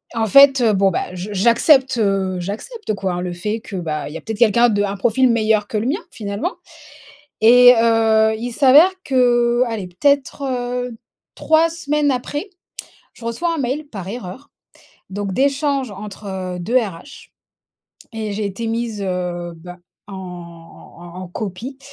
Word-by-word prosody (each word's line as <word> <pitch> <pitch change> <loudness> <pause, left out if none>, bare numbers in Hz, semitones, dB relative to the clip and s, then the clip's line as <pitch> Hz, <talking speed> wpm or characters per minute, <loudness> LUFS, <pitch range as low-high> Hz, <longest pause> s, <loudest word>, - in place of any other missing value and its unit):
en 225 -1 +1
fait, 275 +3 +7
heu, 225 -3 +3
bon 195 0 +3
bah, 180 - -3
je 185 +3 -6
j'accepte, 245 - +3
heu, 195 -3 0
j'accepte 215 - -5
quoi, 185 -3 -3
le 180 0 -4
fait 210 +6 -3
que, 210 - -9
bah, 155 -4 -4
il - - -10
y - - -3
a - - -10
peut-être 220 -1 -6
quelqu'un 235 +1 +4
de 205 -2 0
un 200 0 -3
profil 240 +5 +2
meilleur 215 -2 +1
que 215 - -3
le 210 - -2
mien 285 - -1
finalement. 200 -2 -4 0.9
Et, 245 +2 +8
heu, 220 -1 +3
il 240 +2 -5
s'avère 290 +8 +6
que, 240 -2 +2
allez, 220 -5 -4
peut-être, 280 +9 0
heu, 250 -2 -3 0.4
3 320 +1 +3
semaines 300 -3 0
après, 290 - -4 0.6
je 230 - -13
reçois 330 +9 -2
un - - -4
mail 275 +4 -3
par 195 -9 -8
erreur, 230 +5 -8 0.6
donc 200 0 -4
d'échanges 275 0 0
entre 190 -2 -7
2 230 +9 +2
RH 215 - -7 0.8
et 220 -2 -4
j'ai 205 +1 -2
été 200 +4 -5
mise, 225 -2 -3
heu, 180 -2 -3
bah, 180 +2 -11 0.3
en 200 - -8 0.9
en 175 +1 -10
en 185 - -8
copie 215 +8 -6
225 Hz, 160 wpm, -19 LUFS, 195-255 Hz, 0.9 s, Et